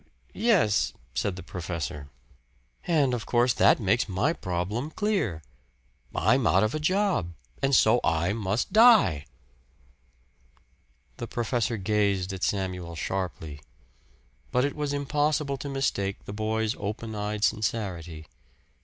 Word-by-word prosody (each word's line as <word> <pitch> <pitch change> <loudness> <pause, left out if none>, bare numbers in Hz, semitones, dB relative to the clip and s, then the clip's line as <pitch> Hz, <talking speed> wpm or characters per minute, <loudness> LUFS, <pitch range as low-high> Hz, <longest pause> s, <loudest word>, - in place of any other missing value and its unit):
"Er - - -35
yes," 195 - +3 0.2
said 95 +8 -1
the 95 - -8
professor. 80 -6 -5 0.8
"And, 150 -7 +2
of 120 -2 -3
course, 120 0 +3
that - - +4
makes 105 +2 +1
my 110 - +1
problem 100 - -3
clear 170 - -1 0.7
I'm 120 +4 +3
out 95 +3 +4
of 110 - 0
a 155 - -2
job, 155 - 0 0.3
and 135 0 +3
so 115 +1 +5
I 85 +3 +1
must 105 0 -2
die." 215 - +6 1.9
The 120 - -5
professor 120 0 -1
gazed 100 -2 0
at 95 - -7
Samuel 90 -4 -2
sharply. 80 -4 -4 0.9
But 125 +2 +2
it 145 - -3
was 150 -2 -2
impossible 145 0 0
to 140 - -6
mistake 100 -8 -2
the 100 - -7
boy's 110 +1 -1
open 110 +2 -4
eyed 105 0 -3
sincerity. 95 -8 -2
110 Hz, 125 wpm, -27 LUFS, 95-135 Hz, 1.9 s, die